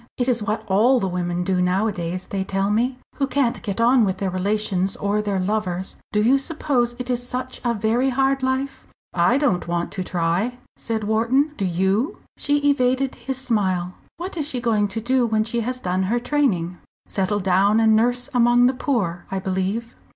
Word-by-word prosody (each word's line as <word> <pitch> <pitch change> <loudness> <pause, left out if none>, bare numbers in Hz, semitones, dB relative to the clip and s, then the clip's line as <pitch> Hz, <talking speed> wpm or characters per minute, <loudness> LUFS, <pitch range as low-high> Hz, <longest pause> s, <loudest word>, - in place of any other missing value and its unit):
It 245 - 0
is 240 -3 +2
what 215 +1 -2
all 230 +7 +4
the 195 - -1
women 175 -1 -2
do 185 0 +1
nowadays, 180 -1 -1
they 195 -1 -3
tell 195 +1 -1
me, 245 +4 +1 0.2
who 275 - +1
can't 270 -4 0
get 205 -3 -4
on 240 +1 +5
with 190 -2 0
their 190 -1 -2
relations 195 0 0
or 205 +1 0
their 200 -2 -1
lovers. 185 -2 -2 0.2
Do 210 0 +2
you 265 +5 +4
suppose 265 -5 -1
it 250 0 -3
is 245 -1 0
such 255 +1 -4
a 240 -1 +1
very 225 +5 +1
hard 270 +1 +1
life?" 260 +1 -2 0.3
"I 180 +8 +3
don't 250 - +1
want 170 0 -2
to 185 - -3
try!" 180 +8 -1 0.2
said 225 -1 -3
Wharton. 235 +8 +2
"Do 200 - -2
you?" 190 - 0 0.2
She 290 0 +1
evaded 260 0 +1
his 265 -1 -5
smile. 190 -8 0 0.2
"What 360 +3 -6
is 295 -3 -1
she 260 -5 -3
going 220 -4 +1
to 225 +3 -4
do 250 +1 +2
when 215 -1 +1
she 235 +2 -2
has 255 +3 -3
done 185 -3 -1
her 240 - +2
training?" 235 - 0 0.3
"Settle 200 +1 -1
down 195 +3 +3
and 220 -1 +5
nurse 245 +3 +1
among 240 0 +5
the 255 - +3
poor, 205 - -1
I 195 - -2
believe." 190 +5 -2
220 Hz, 195 wpm, -22 LUFS, 190-250 Hz, 0.3 s, on